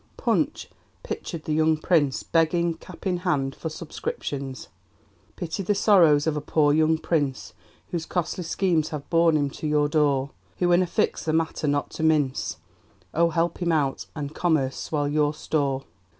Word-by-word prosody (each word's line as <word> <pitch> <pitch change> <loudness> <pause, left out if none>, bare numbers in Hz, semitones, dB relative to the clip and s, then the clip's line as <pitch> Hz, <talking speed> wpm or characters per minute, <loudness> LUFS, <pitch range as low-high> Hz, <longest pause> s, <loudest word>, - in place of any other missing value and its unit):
Punch - - 0 0.4
pictured 165 -3 -5
the 155 - -2
young 155 0 +3
Prince 155 -4 +1
begging, 170 +1 +2
cap 170 +3 -13
in 185 -2 +1
hand, 145 -7 0
for 160 - -5
subscriptions: 140 -4 -5 0.7
Pity 175 +3 -4
the 200 +2 0
sorrows 170 -8 +5
of 160 -2 0
a 150 - -2
poor, 145 0 +2
young 160 +1 +3
Prince 145 -5 -1 0.4
Whose 165 -2 -3
costly 180 0 -2
schemes 165 -2 +1
have 150 -2 -6
borne 165 -2 +4
him 145 -2 0
to 155 - -5
your 150 -1 +2
door; 140 -3 +1 0.3
Who's 175 0 +2
in 175 - +5
a 180 - 0
fix, 170 - 0
the 155 - -1
matter 160 -1 0
not 145 0 0
to - - -6
mince, 150 - +1 0.6
Oh! 170 +1 +3
help 170 +1 0
him 175 -2 0
out, 145 -4 0
and 145 -1 -5
Commerce 155 -6 +1
swell 145 -2 -2
your 150 0 +1
store! 140 -3 -1
155 Hz, 170 wpm, -25 LUFS, 145-170 Hz, 0.7 s, sorrows